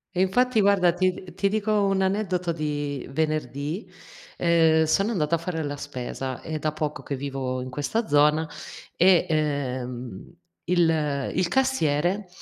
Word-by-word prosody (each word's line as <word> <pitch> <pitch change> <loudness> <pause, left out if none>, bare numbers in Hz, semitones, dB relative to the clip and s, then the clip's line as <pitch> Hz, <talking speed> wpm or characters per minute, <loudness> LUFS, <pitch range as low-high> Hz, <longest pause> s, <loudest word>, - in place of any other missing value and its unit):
E 180 - +2
infatti 235 +4 +3
guarda, 195 -3 +4
ti 185 +1 +2
d 180 -1 -11
ti 195 +1 +1
dico 215 +1 -1
un 195 -1 +1
aneddoto 190 -3 0
di 145 -3 -3
venerdì. 155 - -2 0.5
Ehm, 160 -2 +4
sono 195 +8 +1
andata 170 -5 +1
a - - -1
fare 165 -1 -3
la 145 -1 -3
spesa, 130 -2 -5
è 155 -1 -4
da 155 0 -1
poco 150 -1 -4
che 140 - -3
vivo 130 -2 -3
in 130 - -6
questa 150 - -2
zona 150 +2 +3 0.5
e, 180 0 +5
ehm, 130 - -3 0.4
il 160 -5 +1
il 180 - +1
cassiere, 190 - +1
160 Hz, 150 wpm, -25 LUFS, 145-185 Hz, 0.5 s, e